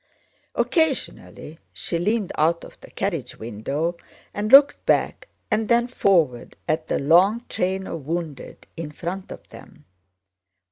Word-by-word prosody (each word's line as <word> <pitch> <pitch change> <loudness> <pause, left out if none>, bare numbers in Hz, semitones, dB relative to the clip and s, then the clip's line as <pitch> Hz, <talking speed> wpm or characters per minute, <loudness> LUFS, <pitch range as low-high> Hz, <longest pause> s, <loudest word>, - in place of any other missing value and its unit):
Occasionally 275 - -1
she 170 - -3
leaned 210 +2 0
out 165 +2 +1
of - - -13
the - - -13
carriage 170 - -3
window 135 +10 -3 0.4
and 210 +2 -3
looked 275 +1 +7
back - - +1 0.2
and 215 0 +1
then 235 0 +4
forward 170 - +1
at 155 +1 -1
the - - 0
long 190 - +4
train 190 +1 -1
of 155 -7 -7
wounded 165 -4 -5
in 160 -2 -6
front 180 +5 -6
of - - -10
them. - - -15
175 Hz, 135 wpm, -23 LUFS, 155-210 Hz, 0.4 s, looked